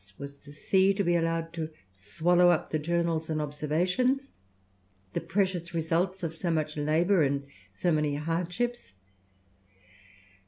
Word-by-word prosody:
Was 140 0 -9
the 145 - -14
sea 190 +6 +2
to 200 - +1
be 175 -1 +2
allowed 165 0 0
to 160 -2 -3 0.2
swallow 165 - +3
up 175 -3 +1
the 155 - +1
journals 165 0 0
and 155 -1 0
observations, 180 - 0 0.8
the - - -1
precious 175 -1 -1
results 175 +4 0
of 165 -1 -2
so 170 +2 -3
much 155 -2 0
labour 160 +5 +2
and 140 -1 +1 0.3
so 135 - 0
many 150 -2 +1
hardships? 175 - -2
165 Hz, 135 wpm, -29 LUFS, 150-180 Hz, 0.8 s, swallow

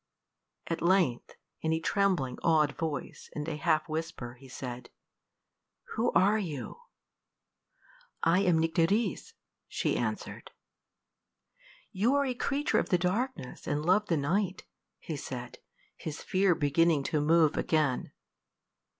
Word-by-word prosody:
At 165 - -3
length, 170 -8 +2 0.3
in 160 - 0
a 160 - +1
trembling, 170 -8 0
awed 155 -3 +3
voice, 155 -4 -5
and 150 0 -4
a 160 - -2
half 155 +1 +1
whisper, 155 -6 -4
he 130 +2 -15
said, 125 -1 -7 1.0
"Who 230 +2 +1
are 200 +5 +4
you?" 160 - -5 1.4
"I 170 +3 +4
am 180 -4 +3
Nycteris," 165 +7 +1 0.3
she - - -1
answered. - - -3 1.4
"You 225 +7 +2
are 280 0 +3
a 255 - -1
creature 275 +4 0
of - - -2
the 180 - +4
darkness, 185 - -2
and 150 +1 -1
love 200 +4 +3
the 165 - +1
night," 185 +6 -1 0.3
he 160 - -6
said, 125 -3 -7 0.4
his 155 -2 -6
fear 190 -2 +3
beginning 150 +1 +2
to 150 - +3
move 155 0 +4
again. 150 -5 0
165 Hz, 125 wpm, -30 LUFS, 145-190 Hz, 1.4 s, are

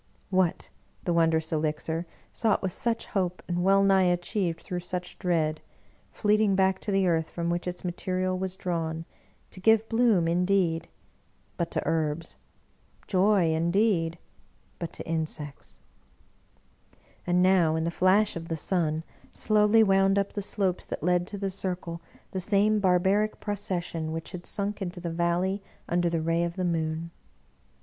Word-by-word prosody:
What! 185 -3 +1 0.3
the 175 - 0
wondrous 160 -1 +2
elixir, 160 +2 -1 0.3
sought 220 -3 +1
with 190 - 0
such 235 +5 -1
hope 180 -2 -2
and 175 0 -1
well 195 +1 +5
nigh 195 -1 +4
achieved 175 0 -1
through 180 - -4
such 180 0 -4
dread, 160 -3 0 0.5
fleeting 210 -1 +2
back 190 0 +2
to 210 - -4
the 195 -1 +2
earth 165 -2 +1
from 170 0 -2
which 175 +1 -2
its 180 +1 -5
ma 175 - 0
terial 185 +1 -1
was 190 0 -3
drawn 165 -3 -3 0.5
to - - -10
give 220 +3 +4
bloom, 225 -7 +3
indeed 175 -1 +1 0.4
— - - -38
^but 170 -1 0
to - - -2
herbs; 160 0 -1 0.7
joy 190 -3 +3
indeed 170 0 +1 0.3
— - - -37
but 170 -2 -4
to - - -8
insects 155 -3 -4 1.4
1 175 - +1
And 180 - +4
now, 180 -4 +4
in 160 - 0
the 170 - -1
flash 195 +4 +3
of 165 0 -6
the 165 - -2
sun, 160 -2 0 0.3
slowly 215 +1 +4
wound 195 -1 +3
up 200 0 0
the 205 - -3
slopes 195 -2 +1
that - - -6
led 180 0 +2
to 205 - -6
the 195 -1 -2
circle, 180 -3 -4 0.3
the 190 - -2
same 210 +3 +3
barbaric 195 +3 +2
procession 175 -6 -3
which 165 0 -5
had 175 -1 -7
sunk 205 0 -3
into 180 -1 -4
the 170 -1 -4
valley 175 +4 0 0.3
under 175 0 +1
the 165 -1 -1
ray 165 +1 +1
of 170 0 -3
the 185 - -1
moon. 165 -1 -2
180 Hz, 165 wpm, -27 LUFS, 165-195 Hz, 1.4 s, well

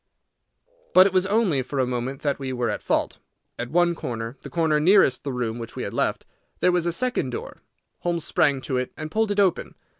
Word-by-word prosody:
But 185 - +9
it 195 - +1
was 185 0 +2
only 200 - +2
for 140 +2 -6
a 130 - +2
moment 125 +2 -4
that 145 -2 0
we 135 -1 -4
were 120 -3 -1
at - - -4
fault. - - -1 0.4
At 120 - -3
one 175 +2 +3
corner, 115 -5 -5
the - - -9
corner 160 -3 +1
nearest 175 -5 +4
the 140 - -3
room 120 -2 -3
which 115 - -8
we - - -4
had - - -5
left, - - -1 0.3
there 180 - +4
was 175 -1 +1
a - - +2
second 245 - -1
door. 120 - -6 0.4
Holmes 170 -2 -1
sprang 140 -4 +2
to 130 -1 -2
it 125 0 -2
and 155 0 -6
pulled 220 +2 +1
it 205 0 0
open. 190 -4 +1
150 Hz, 220 wpm, -24 LUFS, 125-180 Hz, 0.4 s, But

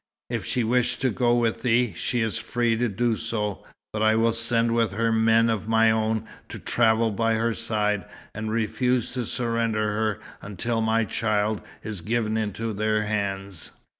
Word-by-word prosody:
If - - -2
she 125 - 0
wish 125 +2 +1
to 130 -2 0
go 120 +2 +2
with 115 -2 0
thee, 120 -3 +2
she 120 +6 -1
is 110 -1 -1
free 120 -1 0
to 120 +1 0
do 115 +3 0
so. 105 -3 -3 0.3
But 110 - -2
I 110 0 +4
will 115 +1 +3
send 115 0 +1
with 115 -4 +1
her 115 +2 +1
men 115 +1 +4
of 110 -2 -1
my 110 0 +4
own, 110 0 0 0.2
to - - -7
travel 115 -1 +2
by 115 +2 +1
her 115 +1 +1
side, 105 -3 -1 0.3
and 110 +1 -4
refuse 120 +2 0
to 125 -2 -2
surrender 115 -3 0
her 110 0 -1 0.2
until 115 +4 -2
my 110 0 +2
child 105 0 0 0.2
is 105 -5 -5
given 110 +3 -1
into 110 +1 -2
their 110 +1 +1
hands." 100 -4 -3
110 Hz, 175 wpm, -25 LUFS, 110-115 Hz, 0.3 s, I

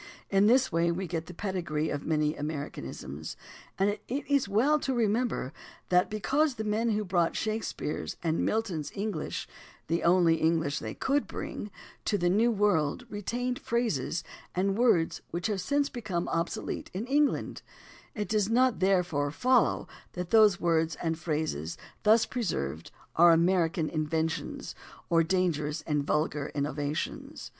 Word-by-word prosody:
In 195 +1 +5
this 260 +3 +4
way 170 +1 +2
we 185 +3 -2
get 165 -1 -4
the 180 - -8
pedigree 170 -6 -2
of 145 -1 -4
many 155 -1 +1
"Americanisms," 110 - -6 0.4
and 195 - +3
it 205 - -7
is 280 -2 0
well 265 +10 +3
to 265 -2 -1
remember 225 - 0 0.4
that 180 0 +4
because 270 +7 +1
the 220 - -3
men 215 +2 0
who 210 -1 0
brought 175 -3 +1
Shakespeare's 215 -8 -3
and 165 -1 +1
Milton's 195 -9 -1
EngHsh 200 -6 -3 0.4
(the 165 +2 0
only 170 -2 +4
English 160 -3 +1
they 110 -1 -6
could 280 +2 0
bring) 205 - -5 0.4
to 205 - +1
the 175 -1 +2
New 220 +5 +4
World 205 -3 +1
retained 245 +5 -2
phrases 220 - -1 0.3
and 195 +2 +1
words 215 -8 +2
which 175 +1 -4
have 205 -3 0
since 285 +7 +1
become 215 -10 -3
obsolete 165 +1 -2
in 205 +5 -2
Eng 290 +3 +4
land, - - -5 0.5
it 210 -1 -2
does 210 -2 +1
not 250 +1 +3
therefore 180 -7 +2
follow 250 - +2 0.3
that 180 -1 -5
those 215 -5 +6
words 165 -2 +1
and 165 0 -2
phrases 150 - -2 0.2
thus 220 +1 +5
preserved 85 - -3 0.3
are 170 +1 +7
American 165 -1 +3
inventions 160 +1 -2 0.4
or 165 -1 +5
dangerous 160 -3 0
and 150 -2 0
vulgar 150 -1 0
innovations. 145 +1 -3
180 Hz, 150 wpm, -29 LUFS, 160-220 Hz, 0.5 s, are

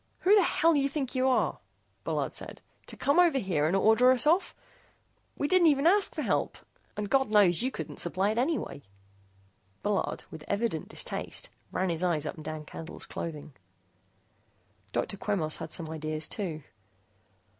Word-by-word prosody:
"Who 385 - +4
the 420 - +7
hell 330 -2 +3
you 280 -1 +2
think 275 -3 -3
you 260 0 +1
are," 255 - +1 0.4
Bullard - - -2
said, - - -6 0.2
"to - - -8
come 285 +5 +2
over 345 -6 +5
here 175 - 0
and 175 - +1
order 220 +5 +5
us 255 0 +5
off? 340 +5 +2 0.8
We 285 - 0
didn't 360 0 +5
even 285 -1 +3
ask 390 +4 +4
for - - -2
help. - - -1 0.4
And, 210 0 -2
God 265 +2 +2
knows, 205 -5 +4
you 255 - 0
couldn't - - -7
supply 190 +4 0
it 220 - -1
anyway." 275 - -1 1.0
Bullard, 205 -1 -1
with 160 -1 -9
evident 200 -6 -2
distaste, - - -4 0.2
ran 185 0 -1
his 165 +1 -2
eyes 165 -4 +1
up - - -3
and 155 - -11
down 155 0 -6
Candle's 160 +2 -8
clothing. 150 -3 -6 1.4
Dr. 200 - -2
Quemos 180 -7 0
had 160 - -7
some 165 -3 -2
ideas, 155 0 -3
too. 165 -7 -4
205 Hz, 165 wpm, -29 LUFS, -, 1.4 s, the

